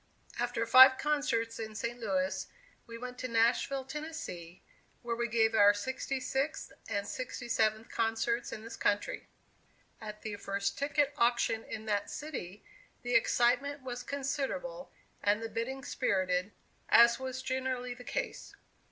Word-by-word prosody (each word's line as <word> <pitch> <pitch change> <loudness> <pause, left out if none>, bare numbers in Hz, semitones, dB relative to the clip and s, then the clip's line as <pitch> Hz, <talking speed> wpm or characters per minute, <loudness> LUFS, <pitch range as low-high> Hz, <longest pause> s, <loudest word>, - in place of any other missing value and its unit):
After 240 -1 0
five 260 +3 +9
concerts 260 -7 0
in 220 -1 -5
St. 235 +3 -3
Louis, 275 +4 -1 0.4
we 230 0 -8
went 250 +1 -7
to 255 - -3
Nashville, 240 +3 +2
Tennessee, 265 - -7 0.4
where 235 -1 -2
we 235 0 -1
gave 225 -1 +2
our 205 -1 +6
sixty 260 +5 -3
sixth 270 +4 -2 0.2
and 200 0 -2
sixty 250 0 -5
seventh 220 -1 +1
concerts 230 +1 0
in 215 - -7
this 230 - -7
country. 205 0 -1 0.7
At 210 -1 -8
the 210 -2 -4
first 200 0 -2
ticket 290 0 +1
auction 235 -1 +2
in 220 0 -7
that 205 -2 -1
city, 210 - -6 0.4
the 245 0 -2
excitement 255 +4 +2
was 245 -1 -5
considerable 285 - -3 0.3
and 205 +1 +2
the 225 0 -5
bidding 265 +4 -3
spirited, 185 -4 0 0.4
as 235 +1 +7
was 260 0 -5
generally 255 -1 -2
the 245 0 -12
case. - - -4
240 Hz, 145 wpm, -32 LUFS, 220-265 Hz, 0.7 s, five